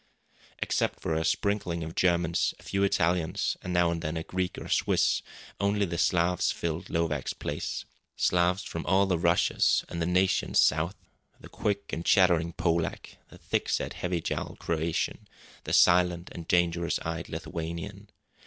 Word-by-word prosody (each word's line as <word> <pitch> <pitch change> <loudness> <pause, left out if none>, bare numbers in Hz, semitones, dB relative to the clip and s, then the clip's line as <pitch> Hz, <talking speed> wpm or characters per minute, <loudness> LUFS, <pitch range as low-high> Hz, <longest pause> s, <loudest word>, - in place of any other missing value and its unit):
Except - - -1
for 80 - -2
a 80 +1 0
sprinkling 90 -3 0
of 80 +1 -6
Germans, 85 -2 +1
a - - -18
few 100 - -2
Italians, 90 -4 +1
and 90 - -5
now 85 -1 +3
and 85 -1 -3
then 80 0 -3
a 80 - -3
Greek 90 +1 -3
or - - -7
Swiss, - - +2 0.4
only 100 0 +1
the 85 -2 -4
Slavs 90 0 +2
filled 85 +2 -4
Lovak's 85 -1 -1
place! - - -4 0.3
Slavs 90 +2 +2
from 85 - -5
all 95 +3 +4
the 90 -3 0
Russias 85 +1 +2
and 85 - -4
the 85 - 0
nations 90 +1 +2
south: 80 +5 +3 0.4
the - - -13
quick 100 -1 -2
and 85 - -2
chattering 85 -3 +4
Polak; 85 -1 -1
the - - -14
thick - - -2
set, - - -1
heavy 90 -2 -2
jowled - - -4
Croatian; 80 0 -2 0.4
the - - -4
silent 90 0 +4
and 85 -2 -8
dangerous 85 -1 +2
eyed 80 -1 -4
Lithuanian. 85 +5 -6
85 Hz, 160 wpm, -28 LUFS, 85-90 Hz, 0.4 s, all